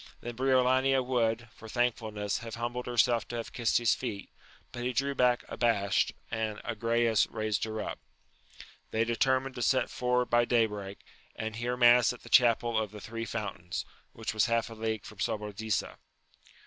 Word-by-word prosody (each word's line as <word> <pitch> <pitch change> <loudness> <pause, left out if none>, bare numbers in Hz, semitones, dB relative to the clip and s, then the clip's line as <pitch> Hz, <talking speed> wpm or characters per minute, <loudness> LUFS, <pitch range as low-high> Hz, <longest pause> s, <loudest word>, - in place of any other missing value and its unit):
Then 120 0 -6
Briolania 130 +1 +3
would, 120 -2 0
for 110 - -11
thankfulness, 110 -4 -1
have 115 -1 -7
humbled 120 +1 -4
herself 120 -1 +2
to 120 - -6
have 115 -1 -5
kissed 120 -2 +2
his 120 -2 +3
feet, 110 -6 -5 0.4
but 120 - -6
he 125 +1 -1
drew 140 +4 0
back 125 -2 +2
abashed, 105 -5 +1 0.2
and 110 -2 -2
Agrayes 115 0 +1
raised 110 -1 -1
her 110 0 -4
up. - - -5 0.9
They 110 +1 +1
determined 130 +3 +1
to 120 - -6
set 130 +2 +2
for 125 0 0
ward 125 - -4
by 120 0 +4
day 120 -2 +3
break, 100 -2 -7 0.3
and 110 0 -4
hear 120 +2 -2
mass 120 0 +6
at 125 - -14
the 120 - -12
chapel 120 -1 +4
of 110 -2 -2
the 105 +1 -10
{Three 115 +2 -5
Fountains, 100 -6 -4 0.3
which 110 -1 -5
was 110 +1 +2
half 115 -1 0
a - - -6
league 110 -1 -3
from 110 - -12
Sobradisa. 105 0 -2
115 Hz, 175 wpm, -30 LUFS, 110-125 Hz, 0.9 s, mass